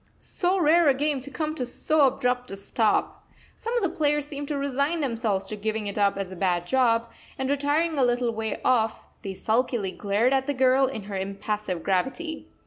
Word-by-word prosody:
So 370 +1 -1
rare 335 0 +5
a 270 - +4
game 290 0 0
to 275 - -6
come 310 +1 -3
to 275 - -3
so 290 +4 +2
abrupt 250 -1 -1
a 195 - -6
stop! 210 +2 0 0.3
Some 465 +2 -3
of 470 - 0
the 375 - -1
players 295 -1 +1
seemed 290 -1 -6
to 290 - -2
resign 280 +4 0
themselves 225 -8 -1
to 215 - -4
giving 215 +1 -2
it 200 - -4
up 200 -1 +2
as 195 -2 -4
a - - -7
bad 175 -2 0
job; 230 0 +2 0.3
and 265 - -2
retiring 290 +2 +1
a - - +4
little 245 -1 +2
way 220 0 -3
off, 225 -3 +2 0.2
they 195 -3 -5
sulkily 225 -2 0
glared 210 +7 +1
at 265 0 +1
the 285 - -1
girl 260 +1 +4
in 240 -6 -5
her 200 0 -5
impassive 195 -1 -3
gravity. 265 - -2
250 Hz, 205 wpm, -26 LUFS, 210-285 Hz, 0.3 s, rare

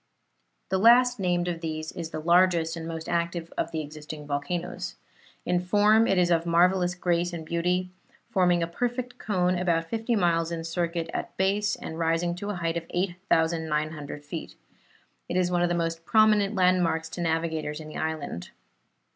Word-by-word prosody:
The 190 - +1
last 245 +2 +6
named 175 -2 0
of 170 -2 -3
these 155 -1 -4
is 170 -3 -6
the 155 - -5
largest 170 0 +3
and 165 -1 -6
most 165 -1 -5
active 170 0 -2
of - - -1
the 160 -1 -3
existing 150 0 -8
volcanoes. 150 +5 -3 0.5
In 180 - +2
form 210 +5 +4
it 195 - +2
is 175 -1 +3
of 165 -1 +3
marvellous 180 +1 +3
grace 175 -1 0
and 165 -2 -5
beauty, 180 +2 0 0.4
forming 180 -2 +2
a - - -1
perfect 245 +7 -3
cone, 180 -3 +1
about 170 -2 +1
fifty 230 +1 0
miles 170 -4 +1
in 165 -1 -3
circuit 165 0 -2
at - - -5
base 200 +2 +1
and 160 - -7
rising 165 +1 +1
to 205 +3 -5
a 205 - -2
height 170 -1 -1
of 165 - -4
8,900 160 -5 -1
feet. 160 +2 -7 0.7
It 180 - -1
is 180 -1 +2
one 175 -1 +2
of 175 - +2
the 175 - +1
most 165 -1 -2
prominent 215 +1 +4
landmarks 180 -3 +2
to 175 - -6
navigators 160 -2 -1
in 155 - -9
the 155 - -8
island. 155 - -4
170 Hz, 175 wpm, -27 LUFS, 165-185 Hz, 0.7 s, last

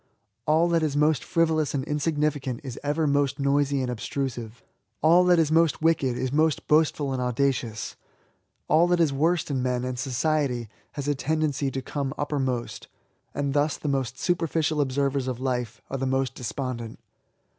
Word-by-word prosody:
All 160 +3 +4
that 170 -1 +2
is 150 -2 0
most 150 -1 +3
frivolous 160 -3 +1
and 135 - -1
insignificant 150 -3 -1
is 130 -4 -6
ever 150 +2 0
most 140 -1 +1
noisy 140 0 +1
and 125 - -2
obtrusive; 120 -1 -4 0.4
all 170 +3 +6
that 180 -1 +5
is 160 -2 +2
most 165 -1 +3
wicked 140 -7 +2
is 130 +1 -2
most 155 0 +1
boastful 150 -2 +2
and 130 - -2
audacious; 125 -4 -1 0.7
all 165 +3 +4
that 175 0 +2
is 160 -4 +3
worst 160 +3 +1
in 130 -2 0
men, 125 0 -1
and 125 -1 -4
society, 130 -3 0 0.2
has 140 -1 -5
a 145 - +3
tendency 145 0 0
to 135 0 -4
come 140 +1 -3
uppermost; 135 -5 -2 0.5
and 140 -1 -1
thus 145 +1 +1
the - - -5
most 135 -2 -1
superficial 165 -3 0
observers 140 -1 0
of 125 -2 -3
life 125 -4 -3
are 135 - -1
the 135 0 -2
most 130 -1 0
despondent. 125 -2 -5
140 Hz, 165 wpm, -26 LUFS, 130-155 Hz, 0.7 s, all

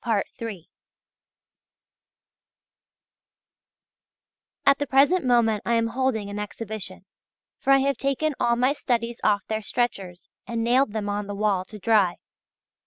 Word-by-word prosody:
At 275 0 +5
the 290 - -2
present 285 +7 +4
moment 235 -4 +2
I 235 - +1
am 230 0 +1
holding 240 -4 -1
an 205 +1 -5
exhibition, 210 -3 -7 0.5
for - - -4
I 275 - +7
have 280 0 0
taken 275 +3 0
all 235 -1 +2
my 255 +3 +2
studies 235 -4 -2
off 205 -1 +2
their 220 0 -3
stretchers, 200 -6 -2 0.2
and 230 -1 -2
nailed 245 -1 +2
them 215 -2 -3
on 205 0 -2
the 205 - -5
wall 200 -3 0
to 210 - -11
dry. 205 -4 +3
230 Hz, 125 wpm, -25 LUFS, 205-260 Hz, 0.5 s, I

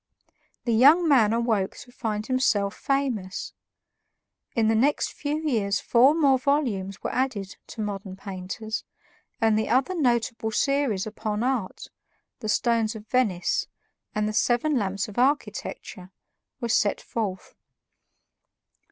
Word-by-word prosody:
The 235 - +1
young 295 +9 +6
man 240 -8 +5
awoke 225 -4 0
to 245 - -12
find 215 -3 -3
himself 220 -6 +1
famous. 255 -9 -2 1.0
In 225 -2 +3
the 225 - +3
next 270 +7 +1
few 295 +1 -2
years 200 -7 +1
four 260 +5 +4
more 275 -5 +4
volumes 240 -10 -1
were - - -2
added 225 -7 -2
to 225 - -7
"Modern 195 -2 -4
Painters," 195 +3 -5 0.6
and 220 -2 +3
the 220 - -2
other 260 +9 +2
notable 235 -7 0
series 270 -4 +1
upon 215 0 -3
art, 250 -7 -2 0.5
"The 215 -3 -4
Stones 230 -1 +1
of 215 -1 -9
Venice" 215 -9 +1 0.5
and 210 0 +1
"The 215 - -2
Seven 245 +7 +2
Lamps 200 -4 -1
of 210 +2 -5
Architecture," 250 -8 -1 0.5
were 235 -2 -3
sent 210 -2 +2
forth. 200 -5 -4
225 Hz, 130 wpm, -25 LUFS, 210-260 Hz, 1.0 s, young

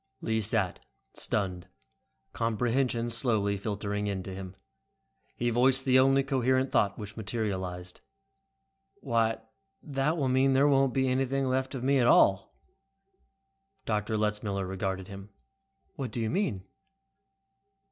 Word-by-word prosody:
Lee 110 0 -1
sat, 105 -3 +1 0.3
stunned, 95 -3 -2 0.7
comprehension 120 +1 0
slowly 110 -4 +1
filtering 105 0 -3
into 95 -1 -4
him. 95 0 -8 0.8
He 120 0 -1
voiced 130 +3 +3
the 130 -1 +5
only 135 +1 +4
coherent 130 -1 +1
thought 100 - +2
which 105 -1 -6
materialized. 95 -4 -4 1.0
"Why 115 -3 0 0.4
that 145 +3 -1
will 140 -4 0
mean 130 +1 +3
there 135 +2 +4
won't 135 -2 +3
be 130 -1 +2
anything 135 +1 0
left 130 +1 -1
of 125 - -5
me 135 +1 +3
at 120 - +3
all." 95 -4 +4 1.3
Dr. 110 0 -1
Letzmiller 105 -2 -1
regarded 95 0 -3
him. 100 0 -10 0.7
"What 135 -4 -3
do 115 - -4
you 110 -1 -1
mean?" 175 - -1
115 Hz, 125 wpm, -29 LUFS, 100-130 Hz, 1.3 s, the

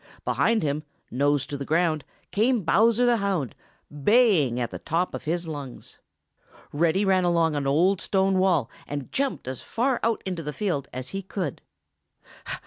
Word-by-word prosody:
Behind 225 -4 +2
him, 145 0 -1 0.3
nose 140 +1 +1
to 145 - -5
the 140 - -4
ground, 160 0 +1 0.3
came 225 +1 +2
Bowser 225 +8 +4
the 240 -1 +4
Hound, 195 - -1 0.5
baying 180 - +4
at 120 - -2
the - - -6
top 170 +3 -1
of - - -6
his 170 +2 -1
lungs. 145 -5 -8 0.7
Reddy 170 +6 +2
ran 190 -1 +3
along 170 -3 +2
an 140 -1 -1
old 175 +7 +3
stone 190 -1 +1
wall 175 -10 +2 0.2
and 145 -2 -5
jumped 275 - -2
as 130 -1 -5
far 250 +2 0
out 230 0 0
into 180 -3 -3
the 150 -1 -5
field 160 -10 -2
as 130 +1 -6
he 195 - -4
could. 185 -6 -4
170 Hz, 165 wpm, -25 LUFS, 145-200 Hz, 0.7 s, Bowser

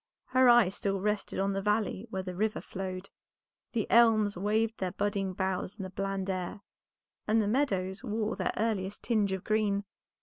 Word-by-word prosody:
Her 255 0 +5
eye 240 -5 +7
still 195 0 -2
rested 210 +1 -1
on 195 +1 +1
the 195 - -1
valley 210 +1 0
where 190 0 -3
the 185 -1 -5
river 215 +4 0
flowed, 185 0 -6 0.6
the 225 -3 0
elms 220 -3 +5
waved 215 +4 0
their 185 -1 -2
budding 200 -2 -1
boughs 190 0 -2
in 205 - -6
the 185 - -6
bland 195 0 -2
air, 185 +1 -3 0.7
and 220 +1 +3
the 210 - +1
meadows 200 -6 0
wore 220 -2 -1
their - - -1
earliest 205 -3 -1
tinge 215 -4 +1
of 190 -1 -3
green. 210 -2 +1
205 Hz, 175 wpm, -30 LUFS, 190-220 Hz, 0.7 s, eye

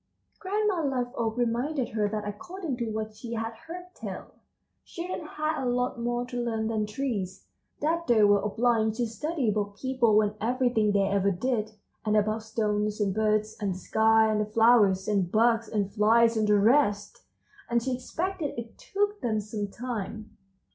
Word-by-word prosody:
Grandma 405 -2 0
Liveoak 245 -4 -2
reminded 245 +3 0
her 210 -2 0
that 210 0 -3
according 320 - -5
to 235 -2 -2
what 215 0 -4
she 230 +2 -7
had 225 0 -3
heard 355 +9 -10
tell, - - -7 0.5
children 340 -2 -6
had 305 -1 -2
a 250 - 0
lot 250 0 -1
more 240 +1 -1
to 245 -1 -4
learn 225 -2 -1
than 215 -2 -1
trees; 210 -6 -3 0.4
that 335 +3 0
they 225 -3 +5
were 205 -1 +5
obliged 220 +1 +1
to 240 +1 0
study 285 +4 -2
about 205 -1 -1
people 250 -5 +3
and 210 0 -1
everything 240 -2 +2
they 200 -1 +3
ever 200 0 +2
did, 215 +2 -1 0.3
and 215 0 +2
about 215 +1 +1
stones 210 -1 -1
and 200 -2 +1
birds 215 0 +1
and 195 -3 -1
the - - -6
sky 220 +3 +3
and 210 0 +1
the - - 0
flowers, 215 -4 +4
and 195 -4 +1
bugs 230 0 +3
and 200 -2 -1
flies 230 +2 +4
and 215 -1 +1
the 210 0 +5
rest, 205 -2 +2 0.5
and 235 -1 +1
she 260 0 -1
expected 320 +5 -3
it 230 -1 -8
took 410 -3 -1
them 220 -3 0
some 210 0 -4
time. 215 -1 -6
225 Hz, 175 wpm, -27 LUFS, 210-250 Hz, 0.5 s, they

